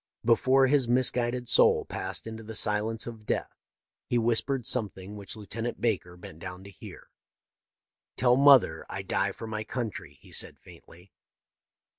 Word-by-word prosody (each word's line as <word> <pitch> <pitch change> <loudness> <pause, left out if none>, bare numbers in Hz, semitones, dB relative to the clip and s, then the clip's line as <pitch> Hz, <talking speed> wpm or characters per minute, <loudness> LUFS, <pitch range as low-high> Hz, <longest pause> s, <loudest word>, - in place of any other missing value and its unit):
Before 130 +3 +4
his 135 -2 +2
misguided 125 0 +1
soul - - +4
passed 95 -1 -3
into 110 0 -7
the 110 0 -8
silence 110 +2 -1
of 110 -2 -9
death - - -2 0.5
he 120 - +1
whispered 120 +2 +2
something 105 -4 -3
which 100 -1 -7
Lieutenant 115 +3 -6
Baker 95 -6 -1
bent 80 -2 -12
down 90 +1 -8
to 100 - -11
hear. 95 - -13 0.5
" - - -64
Tell 125 -1 +4
mother 135 - +5
I 100 - -5
die 95 +1 0
for 115 - -9
my 110 -1 -4
country," 105 - -6
he - - -16
said, - - +1
faintly. 90 +1 -17
110 Hz, 155 wpm, -28 LUFS, 95-120 Hz, 0.5 s, mother